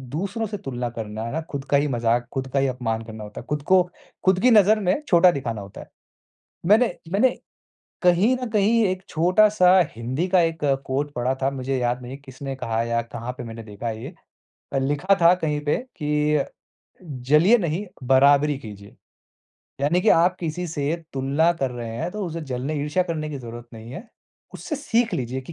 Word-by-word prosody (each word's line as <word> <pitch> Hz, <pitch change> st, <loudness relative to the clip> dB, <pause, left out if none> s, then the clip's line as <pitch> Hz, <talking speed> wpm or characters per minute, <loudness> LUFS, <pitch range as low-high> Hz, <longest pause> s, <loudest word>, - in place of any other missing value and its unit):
दूसरों 200 Hz, +6 st, -2 dB
से 205 Hz, 0 st, -5 dB
तुलना 125 Hz, -7 st, -4 dB
करना 110 Hz, -2 st, -6 dB
है 115 Hz, -, -4 dB
ना, 160 Hz, -, -1 dB
खुद 140 Hz, -2 st, -4 dB
का 140 Hz, -, +6 dB
ही 145 Hz, +1 st, +1 dB
मज़ाक, 120 Hz, -1 st, 0 dB
खुद 130 Hz, -1 st, -3 dB
का 140 Hz, -, +3 dB
ही 135 Hz, -, +2 dB
अपमान 115 Hz, -3 st, -2 dB
करना 110 Hz, -1 st, -8 dB
होता 105 Hz, 0 st, -8 dB
है, -, -, -16 dB
खुद 150 Hz, -1 st, -1 dB
को, 185 Hz, +4 st, +5 dB, 0.4 s
खुद 190 Hz, -1 st, +4 dB
की 250 Hz, -, +5 dB
नज़र 215 Hz, 0 st, +6 dB
में 190 Hz, +7 st, 0 dB
छोटा 175 Hz, 0 st, +6 dB
दिखाना 115 Hz, -7 st, -4 dB
होता 100 Hz, 0 st, -10 dB
है। -, -, -13 dB, 0.8 s
मैंने 220 Hz, +6 st, +4 dB, 0.2 s
मैंने 215 Hz, +6 st, +4 dB, 0.7 s
कहीं 185 Hz, +8 st, +4 dB
न 250 Hz, -, -2 dB
कहीं 215 Hz, +2 st, +3 dB
एक 185 Hz, 0 st, -2 dB
छोटा-सा 185 Hz, +2 st, +4 dB, 0.2 s
हिंदी 130 Hz, +9 st, -2 dB
का 185 Hz, -1 st, +4 dB
एक 165 Hz, -2 st, -1 dB, 0.2 s
कोट 140 Hz, +2 st, -1 dB
पढ़ा 125 Hz, +2 st, 0 dB
था, 135 Hz, -, +2 dB
मुझे 135 Hz, 0 st, -3 dB
याद 125 Hz, 0 st, -1 dB
नहीं 125 Hz, +2 st, -7 dB
किसने 135 Hz, +1 st, -7 dB
कहा 115 Hz, -3 st, -1 dB
या 115 Hz, 0 st, 0 dB
कहाँ 115 Hz, +1 st, -6 dB
पे 125 Hz, -, -5 dB
मैंने 115 Hz, 0 st, -8 dB
देखा 105 Hz, +2 st, -6 dB
है 110 Hz, 0 st, -5 dB
ये। 155 Hz, +7 st, -8 dB, 0.7 s
लिखा 145 Hz, +8 st, +2 dB
था 170 Hz, +1 st, +7 dB
कहीं 155 Hz, -4 st, -2 dB
पे 145 Hz, -, +2 dB, 0.3 s
कि, 150 Hz, 0 st, +1 dB, 0.6 s
"जलिए 150 Hz, -, +3 dB
नहीं, 180 Hz, +2 st, -2 dB, 0.2 s
बराबरी 140 Hz, +3 st, +4 dB
कीजिए।" 100 Hz, -5 st, -11 dB, 0.8 s
यानी 155 Hz, +6 st, +2 dB
कि 225 Hz, -, +2 dB
आप 180 Hz, +2 st, +2 dB
किसी 175 Hz, +1 st, -3 dB
से 150 Hz, +1 st, -1 dB, 0.2 s
तुलना 140 Hz, +5 st, +2 dB
कर 135 Hz, -2 st, 0 dB
रहे 120 Hz, -2 st, -6 dB
हैं, 165 Hz, +8 st, -3 dB
तो 210 Hz, -2 st, -3 dB
उससे 165 Hz, 0 st, -5 dB
जलने 130 Hz, +5 st, -3 dB
ईर्ष्या 150 Hz, +5 st, +1 dB
करने 155 Hz, -3 st, -3 dB
की 140 Hz, -, -5 dB
ज़रूरत 120 Hz, -1 st, -9 dB
नहीं 115 Hz, +1 st, -10 dB
है। 220 Hz, -, -9 dB, 0.5 s
उससे 305 Hz, -, -5 dB
सीख 240 Hz, -5 st, 0 dB
लीजिए 130 Hz, +1 st, -3 dB
कि 170 Hz, -, -10 dB
145 Hz, 195 wpm, -23 LUFS, 125-180 Hz, 0.8 s, था